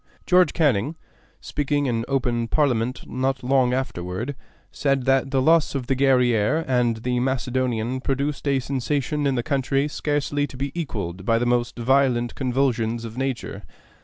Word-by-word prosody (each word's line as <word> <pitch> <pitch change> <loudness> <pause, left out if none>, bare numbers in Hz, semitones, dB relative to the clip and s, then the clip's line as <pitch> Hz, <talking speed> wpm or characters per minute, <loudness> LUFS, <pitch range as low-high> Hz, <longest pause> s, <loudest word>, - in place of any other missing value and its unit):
George 180 -3 +4
Canning, 145 - +1 0.5
speaking 145 0 -1
in 115 -3 -1
open 120 -4 0
Parliament 125 -3 0
not 130 0 -2
long 130 -1 +3
afterward, 120 0 -3 0.4
said 135 -3 0
that 135 0 +2
the 135 -1 +1
loss 160 -1 +3
of 130 -3 -2
the 135 - 0
Guerrière 130 +1 +2
and 125 -3 +1
the 125 0 0
Macedonian 130 -1 -1
produced 140 +2 -2
a 140 -1 +2
sensation 140 +3 -1
in 135 - +1
the 120 - -1
country 140 0 0
scarcely 145 -1 -1
to 130 - -11
be 140 +1 -3
equaled 100 - -4
by 115 +3 +2
the 120 - 0
most 120 0 0
violent 125 -1 +2
convulsions 120 -3 0
of 115 0 -8
nature. 125 -6 -3
130 Hz, 155 wpm, -23 LUFS, 120-140 Hz, 0.5 s, George